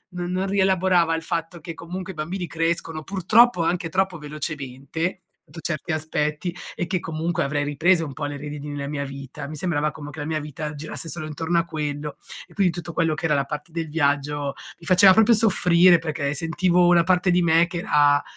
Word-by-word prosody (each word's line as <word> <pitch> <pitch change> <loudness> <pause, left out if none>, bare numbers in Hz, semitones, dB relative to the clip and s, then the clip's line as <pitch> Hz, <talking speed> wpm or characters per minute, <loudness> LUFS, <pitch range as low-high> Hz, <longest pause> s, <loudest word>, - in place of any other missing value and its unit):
non 180 +2 -2
rielaborava 190 -3 +2
il 165 0 -2
fatto 165 +1 -3
che 165 +1 -7
comunque 185 +3 -7
i - - -20
bambini 175 +4 -4
crescono, 165 0 -2
purtroppo, 195 +2 +4
anche 170 0 -1
troppo 185 0 0
velocemente, 150 +3 -5 0.3
su 165 - -9
certi 160 +1 -3
aspetti 155 +2 -2 0.2
e 175 - -3
che 185 -1 -1
comunque 165 +2 -2
avrei 145 +1 -1
ripreso 165 +4 +2
un 140 - -7
po' 145 - -7
le 145 0 -3
redini 150 0 -7
nella 145 -1 -4
mia 145 -1 -3
vita. 140 +1 -8
Mi 155 - -7
sembrava 150 -2 0
come 145 +1 -9
che 160 - -10
la - - -4
mia 155 0 -1
vita 150 0 -6
girasse 155 +2 -6
solo 160 -2 -5
intorno 165 +3 -2
a 170 - -1
quello 150 -2 -4 0.3
e - - -19
quindi 195 -4 +2
tutto 170 -1 -7
quello 165 -2 +1
che 155 +2 -4
era 150 -2 +2
la 140 - +1
parte 150 +3 -7
del 165 -2 -3
viaggio 145 -2 0 0.3
mi 165 - -14
faceva 185 +1 +7
proprio 220 +4 +5
soffrire 180 -5 +5
perché 155 -3 -2
sentivo 175 +3 +2
una 175 -1 +5
parte 180 +1 +2
di 180 0 +3
me 170 0 +4
che 175 0 -4
era 145 -3 +3
165 Hz, 205 wpm, -23 LUFS, 150-175 Hz, 0.3 s, faceva